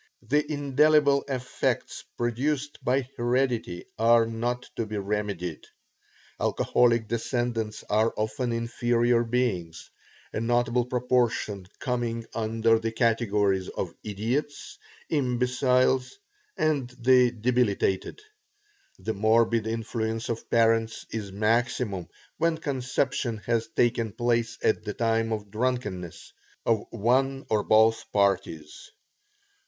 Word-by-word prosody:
The 150 Hz, +2 st, 0 dB
indelible 145 Hz, 0 st, +3 dB
effects 130 Hz, -2 st, -2 dB
produced 140 Hz, +5 st, -2 dB
by 130 Hz, +1 st, +1 dB
heredity 120 Hz, -6 st, 0 dB
are 115 Hz, 0 st, +5 dB
not 120 Hz, +2 st, -3 dB
to 115 Hz, -, -2 dB
be 105 Hz, 0 st, -4 dB
remedied. 100 Hz, -5 st, -3 dB, 0.7 s
Alcoholic 115 Hz, -2 st, +2 dB
descendants 115 Hz, -2 st, -2 dB
are 110 Hz, +2 st, +2 dB
often 110 Hz, +3 st, -1 dB
inferior 120 Hz, 0 st, +1 dB
beings, 115 Hz, -9 st, -2 dB, 0.4 s
a -, -, -1 dB
notable 120 Hz, +1 st, +1 dB
proportion 120 Hz, -6 st, 0 dB
coming 120 Hz, -3 st, -2 dB
under 115 Hz, 0 st, +2 dB
the 115 Hz, 0 st, -2 dB
categories 105 Hz, -5 st, +1 dB
of -, -, -4 dB
idiots, 125 Hz, -, -3 dB, 0.3 s
imbeciles, 125 Hz, -, +1 dB, 0.4 s
and 145 Hz, -5 st, +1 dB
the 125 Hz, 0 st, +5 dB
debilitated. 120 Hz, -, 0 dB, 0.8 s
The 110 Hz, -, -3 dB
morbid 110 Hz, +2 st, +2 dB
influence 115 Hz, 0 st, -3 dB
of 115 Hz, -1 st, -4 dB
parents 115 Hz, -1 st, +2 dB
is 105 Hz, -3 st, -4 dB
maximum 110 Hz, -2 st, 0 dB, 0.3 s
when 165 Hz, -1 st, +2 dB
conception 130 Hz, -5 st, -1 dB
has 115 Hz, -1 st, 0 dB
taken 115 Hz, -3 st, +1 dB
place 120 Hz, -1 st, 0 dB
at -, -, +2 dB
the 105 Hz, -, -5 dB
time 115 Hz, -1 st, +1 dB
of 105 Hz, -2 st, -4 dB
drunkenness 105 Hz, -7 st, -3 dB, 0.3 s
of 110 Hz, -3 st, +1 dB
one 130 Hz, +5 st, +1 dB
or 105 Hz, -1 st, +3 dB
both 110 Hz, +2 st, +3 dB
parties. 95 Hz, -6 st, -1 dB
115 Hz, 105 wpm, -27 LUFS, 110-125 Hz, 0.8 s, are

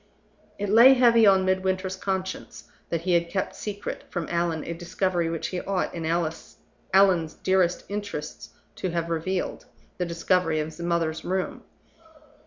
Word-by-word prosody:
It 205 Hz, 0 st, -3 dB
lay 240 Hz, +5 st, +8 dB
heavy 235 Hz, -3 st, +5 dB
on 190 Hz, -1 st, +5 dB
Midwinter's 190 Hz, 0 st, 0 dB
conscience 190 Hz, 0 st, -4 dB, 0.3 s
that 170 Hz, -, -1 dB
he 180 Hz, +1 st, 0 dB
had 170 Hz, 0 st, +2 dB
kept 190 Hz, 0 st, -2 dB
secret 205 Hz, -1 st, -5 dB
from 170 Hz, -3 st, -3 dB
Allan 170 Hz, -2 st, 0 dB
a 170 Hz, -, -4 dB
discovery 175 Hz, 0 st, -1 dB
which 165 Hz, -1 st, -3 dB
he 180 Hz, -, -3 dB
ought 195 Hz, -1 st, -2 dB
in 165 Hz, -2 st, -4 dB
Allan's 170 Hz, +1 st, 0 dB
dearest 185 Hz, -2 st, +2 dB
interests 205 Hz, -7 st, -5 dB, 0.3 s
to 185 Hz, -, -2 dB
have 170 Hz, 0 st, -2 dB
revealed 180 Hz, +3 st, -2 dB, 0.3 s
the 180 Hz, -, 0 dB
discovery 170 Hz, -1 st, +1 dB
of 155 Hz, +1 st, -2 dB
his 160 Hz, -, -14 dB
mother's 170 Hz, -2 st, -1 dB
room. 185 Hz, +1 st, -2 dB
180 Hz, 150 wpm, -26 LUFS, 170-190 Hz, 0.3 s, lay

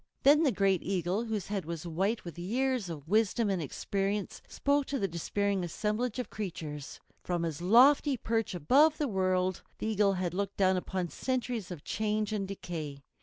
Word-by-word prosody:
Then 295 Hz, +3 st, +7 dB
the 295 Hz, -5 st, +4 dB
great 195 Hz, -3 st, +2 dB
Eagle, 190 Hz, +3 st, -1 dB
whose 215 Hz, -4 st, -2 dB
head 200 Hz, -2 st, -2 dB
was 165 Hz, +1 st, -6 dB
white 190 Hz, +7 st, -1 dB
with 170 Hz, 0 st, -8 dB
years 245 Hz, +2 st, 0 dB
of 155 Hz, -3 st, -7 dB
wisdom 215 Hz, +2 st, +2 dB
and 185 Hz, -3 st, 0 dB
experience, 195 Hz, +6 st, -2 dB
spoke 285 Hz, 0 st, +1 dB
to 280 Hz, -, -1 dB
the 195 Hz, -, 0 dB
despairing 195 Hz, +3 st, -1 dB
assemblage 210 Hz, +7 st, -2 dB
of 250 Hz, -, -4 dB
creatures. 155 Hz, -8 st, -6 dB, 0.2 s
From 175 Hz, -1 st, -1 dB
his 165 Hz, -1 st, -3 dB
lofty 260 Hz, -, +5 dB
perch 225 Hz, -3 st, -1 dB
above 285 Hz, -, +4 dB
the 295 Hz, -, 0 dB
world 185 Hz, -3 st, 0 dB, 0.2 s
the -, -, -4 dB
Eagle 210 Hz, -2 st, +2 dB
had 180 Hz, -2 st, -2 dB
looked 200 Hz, +1 st, -3 dB
down 190 Hz, -1 st, +4 dB
upon 185 Hz, -1 st, -2 dB
centuries 245 Hz, -, -2 dB
of 175 Hz, -5 st, -7 dB
change 215 Hz, 0 st, -1 dB
and 200 Hz, -2 st, -2 dB
decay. 155 Hz, -7 st, -6 dB
195 Hz, 175 wpm, -30 LUFS, 175-225 Hz, 0.2 s, Then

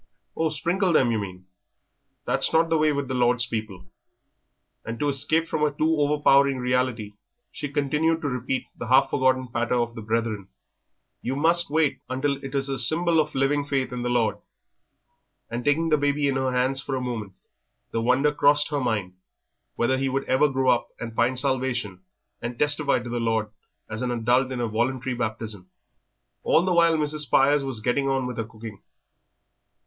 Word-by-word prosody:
"Oh, 160 Hz, 0 st, 0 dB
sprinkle 170 Hz, +4 st, 0 dB
them, 130 Hz, -6 st, +3 dB
you 110 Hz, -, 0 dB
mean. 95 Hz, -2 st, -7 dB, 0.8 s
That's -, -, 0 dB
not 165 Hz, 0 st, +2 dB
the 165 Hz, -, +4 dB
way 155 Hz, 0 st, +3 dB
with 140 Hz, -2 st, -2 dB
the 130 Hz, -, -4 dB
Lord's 120 Hz, -1 st, +2 dB
people;" 110 Hz, -5 st, -5 dB, 1.0 s
and 115 Hz, +1 st, -5 dB
to 145 Hz, -, +1 dB
escape 155 Hz, +4 st, 0 dB
from 160 Hz, -, -3 dB
a 150 Hz, -, +4 dB
too 155 Hz, +1 st, 0 dB
overpowering 140 Hz, -2 st, +3 dB
reality 125 Hz, -4 st, -1 dB, 0.4 s
she 145 Hz, -, -5 dB
continued 150 Hz, +3 st, 0 dB
to -, -, 0 dB
repeat 130 Hz, 0 st, -2 dB
the 120 Hz, -, -7 dB
half 135 Hz, +2 st, +4 dB
forgotten 130 Hz, -1 st, +1 dB
patter 120 Hz, +1 st, -1 dB
of 120 Hz, -1 st, -1 dB
the 115 Hz, -, -8 dB
Brethren, 110 Hz, -2 st, -2 dB, 0.7 s
"You 130 Hz, -, -3 dB
must 165 Hz, +3 st, +3 dB
wait 155 Hz, -1 st, +1 dB
until 135 Hz, +2 st, -2 dB
it 135 Hz, +1 st, -6 dB
is 135 Hz, 0 st, 0 dB
a 135 Hz, -1 st, -2 dB
symbol 165 Hz, +6 st, +4 dB
of 150 Hz, -1 st, -1 dB
living 140 Hz, +2 st, +1 dB
faith 135 Hz, -3 st, -2 dB
in 125 Hz, -, -4 dB
the 120 Hz, -, -2 dB
Lord!" 120 Hz, -3 st, +1 dB, 1.1 s
And 120 Hz, +1 st, -3 dB
taking 160 Hz, +4 st, +1 dB
the 155 Hz, -, +4 dB
baby 145 Hz, 0 st, +1 dB
in 135 Hz, -, 0 dB
her 130 Hz, -1 st, 0 dB
hands 130 Hz, +2 st, 0 dB
for 135 Hz, -, -4 dB
a -, -, -1 dB
moment, 115 Hz, -6 st, -5 dB, 0.6 s
the 115 Hz, -, -1 dB
wonder 130 Hz, +5 st, +2 dB
crossed 145 Hz, 0 st, +3 dB
her 145 Hz, -2 st, -1 dB
mind 105 Hz, -7 st, -2 dB, 0.6 s
whether 130 Hz, +3 st, +1 dB
he 135 Hz, 0 st, 0 dB
would 135 Hz, +1 st, -1 dB
ever 130 Hz, +3 st, +2 dB
grow 130 Hz, -1 st, +2 dB
up 120 Hz, -1 st, 0 dB
and 115 Hz, -2 st, -6 dB
find 120 Hz, +3 st, +1 dB
salvation 125 Hz, -7 st, -1 dB, 0.4 s
and 120 Hz, 0 st, -5 dB
testify 145 Hz, 0 st, +2 dB
to 120 Hz, 0 st, -6 dB
the 120 Hz, 0 st, -2 dB
Lord 110 Hz, -2 st, -1 dB, 0.4 s
as 110 Hz, +1 st, -6 dB
an 125 Hz, -, -1 dB
adult 125 Hz, +2 st, +1 dB
in 120 Hz, -2 st, -2 dB
voluntary 125 Hz, +4 st, -1 dB
baptism. 110 Hz, -5 st, -4 dB, 0.7 s
All 165 Hz, -, +3 dB
the 185 Hz, -, +1 dB
while 170 Hz, -1 st, +4 dB
Mrs. 150 Hz, 0 st, -1 dB
Spires 145 Hz, +1 st, +3 dB
was 130 Hz, -5 st, -4 dB
getting 135 Hz, +4 st, 0 dB
on 135 Hz, -1 st, 0 dB
with 125 Hz, -1 st, -5 dB
her 115 Hz, -, -2 dB
cooking. 110 Hz, -2 st, -11 dB
130 Hz, 185 wpm, -24 LUFS, 120-145 Hz, 1.1 s, the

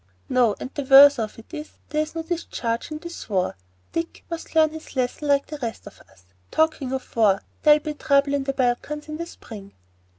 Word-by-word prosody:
"No, 245 Hz, -5 st, +3 dB
and 260 Hz, -, -7 dB
the 290 Hz, -, -3 dB
worser 275 Hz, -1 st, +8 dB
of 215 Hz, -, -5 dB
it 225 Hz, +8 st, -15 dB
is, 305 Hz, -1 st, -7 dB, 0.2 s
there 305 Hz, 0 st, +1 dB
is 310 Hz, +1 st, -5 dB
no 325 Hz, -, -3 dB
discharge 320 Hz, -9 st, -3 dB
in 305 Hz, -, -5 dB
this 340 Hz, -3 st, -9 dB
war. 185 Hz, -3 st, 0 dB, 0.4 s
Dick 330 Hz, 0 st, -4 dB
must 330 Hz, -1 st, -6 dB
learn 315 Hz, -1 st, +5 dB
his 315 Hz, -2 st, -10 dB
lesson 255 Hz, +3 st, -1 dB
like 280 Hz, -1 st, +3 dB
the 300 Hz, -1 st, -8 dB
rest 230 Hz, -4 st, -5 dB
of 205 Hz, -, -12 dB
us. 95 Hz, -1 st, -23 dB, 0.3 s
Talking 315 Hz, -5 st, +1 dB
of 265 Hz, -1 st, -5 dB
war, 205 Hz, -4 st, +3 dB, 0.2 s
there'll 300 Hz, 0 st, +6 dB
be 305 Hz, -, -4 dB
trouble 280 Hz, -2 st, +2 dB
in 280 Hz, -1 st, 0 dB
the 275 Hz, -, -1 dB
Balkans 270 Hz, +4 st, -1 dB
in 305 Hz, -, -4 dB
the 335 Hz, +1 st, -5 dB
spring." 205 Hz, -10 st, -11 dB
280 Hz, 210 wpm, -24 LUFS, 240-310 Hz, 0.4 s, worser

